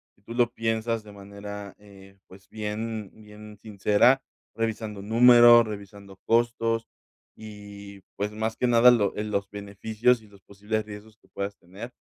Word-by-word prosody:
si - - -32
tú 115 - -10
lo 120 -1 +1
piensas 115 -1 -2
de 105 - -13
manera, 100 0 -9
eh, 100 -1 -17
pues, 95 0 -17
bien 110 0 -5
bien 105 0 -14
sincera, 105 +5 +2 0.3
revisando 110 -2 -4
números, 120 +2 +7
revisando 100 -2 -10
costos 115 -1 0 0.5
y, 100 -2 -11
pues, 105 +1 -3
más 110 +1 -3
que - - -1
nada, 120 +1 +6
lo 110 -5 +1
eh, 105 - -3
los 100 -2 -3
beneficios 110 +4 -1
y 110 - -18
los 100 -1 -20
posibles 105 +2 -4
riesgos 105 +1 -12
que - - -29
puedas 100 0 -6
tener, 100 +8 -11
105 Hz, 155 wpm, -25 LUFS, 100-115 Hz, 0.5 s, números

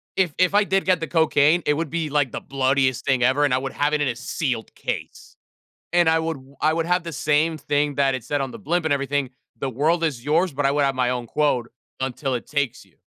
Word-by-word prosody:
if 180 -5 +1
if 185 +1 +3
I 205 +1 +5
did 195 -1 0
get 185 -2 +3
the 165 - -4
cocaine, 160 0 +3
it 150 - +3
would 155 +1 -2
be, 160 0 -2
like, 145 -3 +1
the - - -4
bloodiest 130 -2 0
thing 130 -3 +2
ever, 130 +4 +3
and 140 - +1
I - - +3
would 135 0 -4
have 145 +1 0
it 150 - +1
in 145 - +1
a 120 - -1
sealed 120 -1 -3
case. - - -6 0.6
And 175 -1 +4
I 160 0 +4
would 160 0 -2
w 135 +1 -17
I 155 - +3
would 165 0 -1
have 180 +1 +1
the 165 - -6
same 155 +3 +1
thing 145 0 0
that 135 -1 +2
it 130 -4 -5
said 145 -1 -1
on 135 -1 -2
the - - -9
blimp 170 +2 -1
and 160 - +1
everything, 140 -1 -1 0.3
"The 135 - -2
world 155 +7 +1
is 135 -7 -2
yours." 165 +4 +2
But, 140 +1 0
I 135 - +2
would 145 0 +2
have 135 -1 +1
my 125 -1 +1
own 125 -1 -3
quote, 125 -3 0 0.3
"Until 135 +1 -2
it 120 - -4
takes 145 -4 -2
you." - - -29
145 Hz, 260 wpm, -23 LUFS, 135-160 Hz, 0.6 s, I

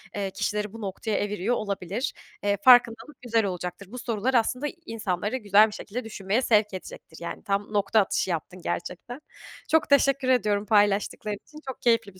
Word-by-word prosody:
eee, 200 -2 -2
kişileri 210 +1 -2
bu 225 - -9
noktaya 200 +2 -4
eviriyor 205 +3 -1
olabilir. 200 +2 -3 0.3
Eee, 205 0 +1
farkındalık 245 +2 +5
güzel 230 -3 +1
olacaktır. 180 +1 -5
Bu 250 - -7
sorular 235 +1 -1
aslında 250 +4 +1 0.2
insanları 210 +1 -2
güzel 210 -2 +5
bir - - -9
şekilde 235 +5 -6
düşünmeye 210 +1 -1
sevk 210 -4 +2
edecektir, 180 -3 -9
yani. 170 - -6
Tam 200 +1 -2
nokta 205 +2 +3
atışı 190 -1 0
yaptın 180 +2 -4
gerçekten. 180 +10 -5 0.5
Çok 320 -1 +3
teşekkür 275 -1 +3
ediyorum 210 -5 +2
paylaştıkların 205 0 +2
için. 305 - -12
Çok 265 - -6
keyifli 230 -4 +2
bir 185 - -19
210 Hz, 165 wpm, -26 LUFS, 200-240 Hz, 0.5 s, farkındalık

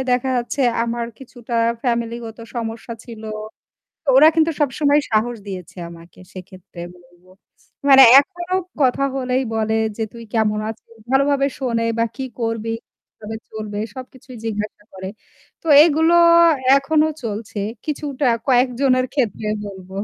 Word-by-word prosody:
দেখা 250 +1 0
যাচ্ছে 245 +3 -3 0.2
আমার 235 0 -3
কিছুটা 245 -2 -9 0.3
ফ্যামিলি 235 -2 -1
গত 225 +1 -10 0.2
সমস্যা 230 0 -5
ছিল। 230 -3 -10 0.9
ওরা 290 +4 +8
কিন্তু 325 0 +3
সবসময় 290 +1 +2
সাহস 225 +2 +1
দিয়েছে 185 -2 -8
আমাকে 170 0 -15
সেক্ষেত্রে 185 -1 -11 0.2
বলবো। 175 +1 -24 0.6
মানে 270 -1 +9 0.2
এখনও 350 +5 -3 0.2
কথা 270 +1 +2
হলেই 255 0 0
বলে 220 0 0 0.2
যে 225 - -1
তুই 230 0 -10
কেমন 215 -2 +1
আছিস? 225 +1 -11 0.2
ভালোভাবে 275 +1 +3
শোনে 230 -4 -1
বা 230 - +3
কি 265 - -3 0.2
করবি 225 -1 -2 0.4
কিভাবে 220 +1 -9
চলবে 215 -1 -6 0.2
সবকিছুই 255 -1 -11
জিজ্ঞাসা 210 -1 -4
করে। 190 0 -7 0.5
তো 330 - -8 0.2
এগুলো 325 +1 +3 0.6
এখনো 305 +3 +2 0.2
চলছে। 215 -1 -5 0.3
কিছুটা 290 -2 -2 0.2
কয়েকজনের 255 0 +2
ক্ষেত্রে 225 -6 -1 0.2
বলব। 190 -2 -10
235 Hz, 130 wpm, -20 LUFS, 215-270 Hz, 0.9 s, মানে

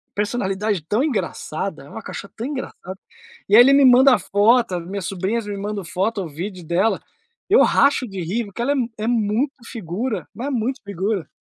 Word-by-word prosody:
personalidade 205 -2 -1
tão 215 +10 +1
engraçada, 195 - -3
é 145 - -14
uma 220 - -8
cachorra 200 - -8
tão 230 - -3
engraçada. 260 -9 -6 0.5
E 205 - +5
aí, 240 - +10
ele 270 +3 +6
me 280 0 +6
manda 255 +1 +7
foto, 205 -2 +2
minhas 190 +1 -5
sobrinhas 195 +5 -2
me 205 - -4
mandam 200 0 -4
foto 195 +6 -1
ou 170 - -5
vídeo 180 +3 -7
dela. 190 +5 +1 0.5
Eu 430 - +6
racho 280 -2 +3
de 195 -3 -6
rir, 205 +8 -2
porque 200 +2 -7
ela 275 +4 +1 0.2
é 215 - -3
muito 235 +4 +1
figura, 220 +2 -4
mas 255 +4 -5
é - - -1
muito 255 +2 -2
figura. 200 -1 -2
210 Hz, 185 wpm, -21 LUFS, 190-245 Hz, 0.5 s, aí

